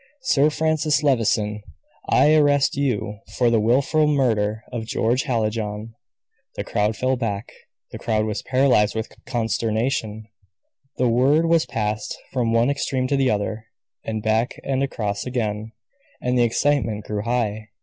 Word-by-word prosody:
Sir 150 - +3
Francis 155 -1 +1
Levison, 110 -6 +1 0.5
I 150 - +5
arrest 145 -3 +3
you 115 -7 -1 0.2
for 120 -2 +3
the 115 - +3
wilful 135 +7 +2
murder 110 -7 +1
of 115 -3 -5
George 120 +4 0
Hallijohn." 110 -3 -2 0.6
The - - -3
crowd 105 +1 -1
fell 130 +1 +1
back; 115 -4 -3 0.4
the - - -7
crowd 110 -1 0
was 110 -1 -3
paralyzed 130 -6 +2
with 110 0 -4
consternation; 115 -2 -1 0.7
the 125 - +2
word 135 +7 +3
was 165 -1 +3
passed 105 -1 -3 0.2
from 120 -3 0
one 115 +4 +3
extreme 135 -2 -1
to 140 - +2
the 135 -1 +2
other, 110 +1 -2 0.4
and 110 -1 -4
back 110 +2 0
and 135 -1 -1
across 105 -6 -2
again, 110 -3 -3 0.5
and 125 0 -1
the 120 -1 +4
excitement 115 -4 0
grew 105 -1 -3
high. 110 -2 -2
115 Hz, 145 wpm, -22 LUFS, 110-135 Hz, 0.7 s, I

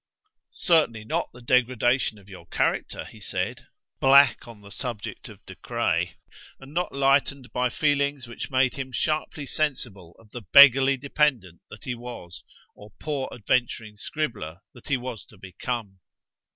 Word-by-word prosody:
"Certainly 155 - +1
not - - -1
the 125 0 -15
degradation 125 -1 +2
of 100 -1 -18
your 90 -4 -12
character," - - -1
he - - -13
said, - - -4 0.3
black 140 -1 +5
on 115 -3 -12
the 100 0 -14
subject 120 -4 -6
of - - -15
De - - -9
Craye, - - -1 0.4
and 135 +2 -13
not 180 +2 -1
lightened 135 -2 +1
by 125 0 +1
feelings 140 -1 0
which 120 +4 -7
made 130 -2 +2
him 130 -1 -6
sharply 155 +2 -2
sensible 120 - -3
of 110 -2 -20
the 120 - -7
beggarly 135 +4 +7
dependant 130 - 0
that 105 - -12
he 125 - -3
was, 120 -8 -9 0.3
or 105 - -14
poor 145 -4 -3
adventuring 115 -2 -1
scribbler 105 - -4
that 120 - -15
he 140 - +1
was 120 -4 -6
to 105 - -17
become. 95 +2 -5
125 Hz, 150 wpm, -25 LUFS, 110-140 Hz, 0.4 s, beggarly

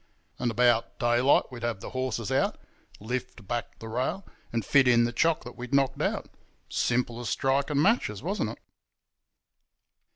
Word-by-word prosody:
And 120 - 0
about 120 0 +2
daylight 120 +3 +4
we'd 120 -2 -8
have 115 -4 -2
the - - -8
horses 130 -4 -2
out, - - +1 0.4
lift 120 -1 -5
back 120 +1 -3
the 110 - -9
rail, 130 - -2 0.3
and 115 -3 -1
fit 135 -2 +5
in 120 -1 +5
the 120 - 0
chock 160 +5 +2
that 120 - -9
we'd 125 +3 -3
knocked 135 -2 +2
out. - - -1 0.4
Simple 120 -1 0
as 120 - -4
striking 140 +2 +1
matches, 150 - +2
wasn't 195 +5 -1
it? - - -8
125 Hz, 160 wpm, -28 LUFS, 120-135 Hz, 0.4 s, fit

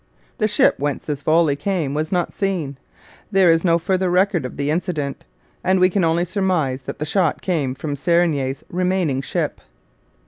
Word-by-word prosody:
The 215 - +3
ship 210 - +3
whence 145 0 -2
this 145 -2 -3
volley 155 0 +3
came 160 -3 -2
was 155 +1 -2
not 180 -2 0
seen; 170 -9 -2 0.5
there 190 -4 +5
is 165 0 +2
no 170 -2 +4
further 185 +2 0
record 180 -3 +2
of - - -12
the 140 +1 0
incident, 155 -4 -3 0.4
and 185 0 +2
we 185 0 +4
can 195 0 +1
only 165 +1 +2
surmise 180 -8 0
that - - -7
the 150 - -3
shot 175 -1 0
came 150 -8 -1
from 145 +1 -4
Serigny's 145 -4 +1
remaining 180 -6 0
ship. - - -3
170 Hz, 175 wpm, -21 LUFS, 145-185 Hz, 0.5 s, there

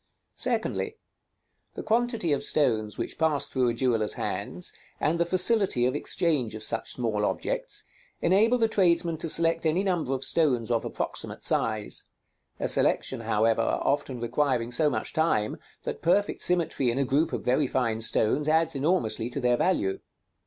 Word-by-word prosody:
Secondly: 440 0 -2 0.8
the - - -5
quantity 225 - +1
of 140 - -1
stones 110 -7 +2
which - - -5
pass 160 -3 +1
through 130 -2 0
a - - 0
jeweller's 115 -4 0
hands, - - -3 0.3
and 165 +3 0
the 170 - +1
facility 185 - +3
of 130 +2 0
exchange 145 -7 -1
of 110 - -5
such 115 - 0
small 110 -4 -1
objects, - - -2 0.4
enable 215 +7 +3
the 225 -2 +2
tradesman 170 -5 +2
to 165 - -2
select 165 +1 +2
any 165 +4 +1
number 175 -8 -1
of 135 0 -1
stones 125 -8 +2
of 115 - +1
approximate - - -5
size; 110 -2 -1 0.5
a - - -1
selection, - - +1
however, 115 +2 +1
often 135 +2 -1
requiring 120 0 0
so 150 +5 +2
much - - -2
time, 160 -10 +1 0.3
that - - -5
perfect 200 +5 +1
symmetry 170 -7 +1
in 120 - -1
a 140 - +1
group 150 +5 +1
of - - -3
very 130 +3 +2
fine 115 -4 -1
stones 115 +6 +1
adds 160 +1 +2
enormously 135 -6 0
to 135 - -3
their 125 -2 +2
value. 100 - 0
145 Hz, 160 wpm, -27 LUFS, 120-170 Hz, 0.8 s, facility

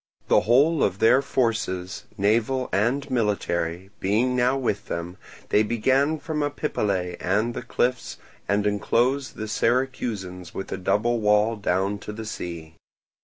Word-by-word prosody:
The - - +6
whole 140 +8 +4
of 95 -1 +1
their 120 +6 +5
forces, 115 -9 -1
naval 115 +6 +1
and 120 +8 +1
military, 95 -6 -1
being 115 +7 +1
now 125 +2 +2
with 105 -6 -2
them, 85 +2 -5 0.3
they 105 - +4
began 130 +8 +2
from 155 -1 -3
Epipolae 100 -11 -1
and 105 +6 0
the - - -5
cliffs 125 +1 -1 0.3
and 100 +1 +2
enclosed 120 +6 +1
the 110 - -5
Syracusans 110 -7 -1
with 95 - -5
a - - -2
double 115 +5 +1
wall 105 +1 +3
down 100 0 -1
to 105 - -7
the 110 +1 -7
sea. 85 -6 -6
110 Hz, 140 wpm, -24 LUFS, 95-125 Hz, 0.3 s, The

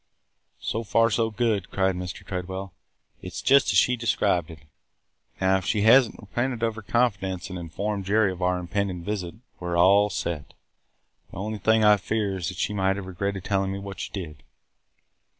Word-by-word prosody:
"So 115 - -2
far 115 +1 +3
so 115 +1 +1
good!" 110 -4 0
cried 95 -1 +1
Mr. 90 -1 -6
Tredwell. 95 0 -5 0.5
"It - - -8
's - - -4
just 140 -5 +5
as 100 - +2
she 125 +6 +4
described 100 -7 +1
it. 80 - -9 0.8
Now, 95 0 +3
if 95 - -6
she 105 - +1
has 120 +3 +7
n't - - -12
repented 120 +3 -3
of 115 -1 +1
her 110 - -8
confidence 95 -5 -1
and 90 - -5
informed 100 +4 -3
Jerry 105 0 +3
of 90 0 -8
our 90 0 +2
impending 90 0 -2
visit, 95 -2 -4 0.2
we 90 - -6
're 85 0 -1
all 100 +4 +5
set. 85 -6 -4 0.7
The - - -11
only 105 +2 -4
thing 110 +2 +3
I 105 -1 +7
fear 100 0 -1
is 85 -2 -3
that 90 -1 -5
she 105 - -1
might 95 -1 +1
have 100 -1 -6
regretted 95 +1 -3
telling 95 -1 0
me 100 - -3
what 100 0 -8
she - - -5
did." 75 -7 -7
100 Hz, 195 wpm, -25 LUFS, 90-110 Hz, 0.8 s, has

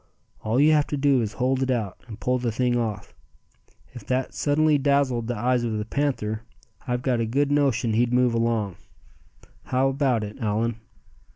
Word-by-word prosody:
All 110 +4 +1
you 150 +2 +5
have 150 -2 +3
to 145 - -3
do 135 -2 +3
is 110 -1 -3
to - - -17
hold 130 +1 +1
it 130 - 0
out, 110 -7 -2
and 110 -3 -9
pull 125 0 0
the 120 -1 -1
thing 125 +2 0
off. 110 -4 -3 0.8
If 120 -4 -9
that 130 0 -1
suddenly 150 0 +2
dazzled 135 -4 +1
the 120 -2 -2
eyes 125 +2 +1
of 115 -2 -1
the 105 - -3
panther, 110 -5 -2 0.5
I've 125 0 -1
got 125 -3 +1
a 115 - +1
good 140 +5 +1
notion 130 -6 +1
he'd 120 +2 +2
move 125 -1 +3
along. 115 -5 0 0.9
How 130 +1 +1
about 135 -5 +1
it, 105 +4 -7
Allan?" 110 0 -1
125 Hz, 190 wpm, -24 LUFS, 115-135 Hz, 0.9 s, you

